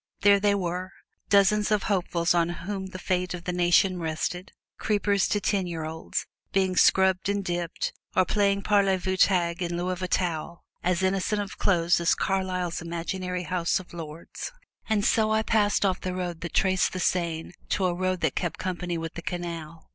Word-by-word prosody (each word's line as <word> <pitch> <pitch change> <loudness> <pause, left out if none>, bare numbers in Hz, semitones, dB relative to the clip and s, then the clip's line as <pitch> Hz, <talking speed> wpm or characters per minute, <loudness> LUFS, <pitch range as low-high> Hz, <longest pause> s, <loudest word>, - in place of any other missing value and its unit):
There 200 0 +6
they 200 0 +3
were, 185 0 -3 0.4
dozens 205 +1 +4
of 210 -2 +2
hopefuls 175 -4 +1
on 170 -1 +2 0.2
whom 195 -1 -3
the 190 - -8
fate 180 0 -1
of 170 - -9
the 180 - -3
nation 180 +1 +3
rested 170 +3 -3 0.3
creepers 205 -2 +1
to 205 - +1
ten 195 -1 0
year 165 -2 -4
olds 160 +1 -4 0.3
being 190 -1 +1
scrubbed 190 0 +4
and 200 -1 -1
dipped, 175 -2 -2 0.2
or 185 - +4
playing 200 -1 +1
parlez 195 -3 +3
vous 190 +1 -1
tag 175 -2 +2
in 170 -1 -2
lieu 175 +1 -2
of 180 - -4
towel, 170 -2 -2 0.2
as 180 +1 +1
innocent 195 +2 +1
of 200 -1 -5
clothes 170 -3 +3
as 170 - +3
Carlyle's 185 -3 -1
imaginary 180 +2 -3
House 180 0 0
of 185 - -13
Lords. 165 -1 -7 0.4
And 210 -2 +2
so 220 -1 +3
I 220 0 +2
passed 210 -2 +2
off 185 -1 +1
from 185 - -4
the - - -5
road 175 -2 -4
that 170 - -6
traced 190 -1 +2
the 185 - -3
Seine 170 -3 -1 0.2
to 195 - +1
a 180 - +2
road 185 0 -1
that 160 -4 +1
kept 175 -3 -2
company 180 -2 -3
with 165 0 -5
the 170 - -6
canal. 170 -2 -6
180 Hz, 190 wpm, -26 LUFS, 170-195 Hz, 0.4 s, There